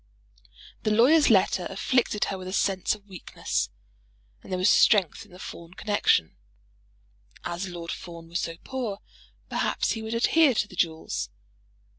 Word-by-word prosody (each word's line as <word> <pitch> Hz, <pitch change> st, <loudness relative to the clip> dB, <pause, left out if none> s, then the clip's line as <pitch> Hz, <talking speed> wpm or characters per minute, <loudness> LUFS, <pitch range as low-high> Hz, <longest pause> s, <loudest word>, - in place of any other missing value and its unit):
The -, -, 0 dB
lawyer's 255 Hz, +9 st, +5 dB
letter 190 Hz, -3 st, +3 dB
afflicted 210 Hz, +1 st, +1 dB
her 195 Hz, -, -3 dB
with 185 Hz, -, -7 dB
a 185 Hz, -, -5 dB
sense 195 Hz, -1 st, +1 dB
of 205 Hz, -1 st, -19 dB
weakness, 190 Hz, -4 st, -3 dB, 0.7 s
and -, -, -13 dB
there 185 Hz, -, 0 dB
was 185 Hz, +2 st, +2 dB
strength 205 Hz, -2 st, +4 dB
in -, -, -23 dB
the 180 Hz, -, -13 dB
Fawn 170 Hz, -1 st, -10 dB
connexion. 205 Hz, -, +1 dB, 1.1 s
As 175 Hz, +3 st, -3 dB
Lord 170 Hz, -1 st, -6 dB
Fawn 170 Hz, -2 st, -8 dB
was 170 Hz, +2 st, -2 dB
so 165 Hz, -, -3 dB
poor, 245 Hz, -7 st, -4 dB, 0.5 s
perhaps -, -, 0 dB
he 225 Hz, -, -3 dB
would 220 Hz, +1 st, -4 dB
adhere 275 Hz, +3 st, +4 dB
to 210 Hz, -, +1 dB
the 185 Hz, -, -13 dB
jewels. 160 Hz, -, -1 dB
195 Hz, 155 wpm, -26 LUFS, 175-220 Hz, 1.1 s, lawyer's